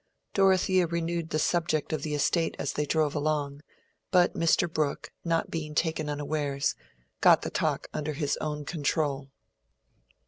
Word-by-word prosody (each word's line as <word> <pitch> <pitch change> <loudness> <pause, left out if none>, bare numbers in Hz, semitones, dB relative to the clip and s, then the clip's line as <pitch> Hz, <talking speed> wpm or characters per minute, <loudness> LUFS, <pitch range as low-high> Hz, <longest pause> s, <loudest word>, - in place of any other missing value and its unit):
Dorothea 190 -2 +3
renewed 170 0 -2
the 155 - 0
subject 155 -1 0
of 155 - -1
the 150 0 -2
estate 165 +3 +1
as - - -2
they 150 0 -1
drove 155 -2 +1
along, 145 -1 -1 0.5
but 180 -2 +4
Mr. 165 +1 +2
Brooke, 155 -3 -2
not 165 -1 0
being 155 -2 -4
taken 160 -2 0
unawares, 145 -1 -1 0.5
got - - +6
the - - -3
talk - - -1
under 155 0 -2
his 145 0 -1
own 150 -1 -4
control. 145 -3 -1
155 Hz, 145 wpm, -28 LUFS, 145-165 Hz, 0.5 s, got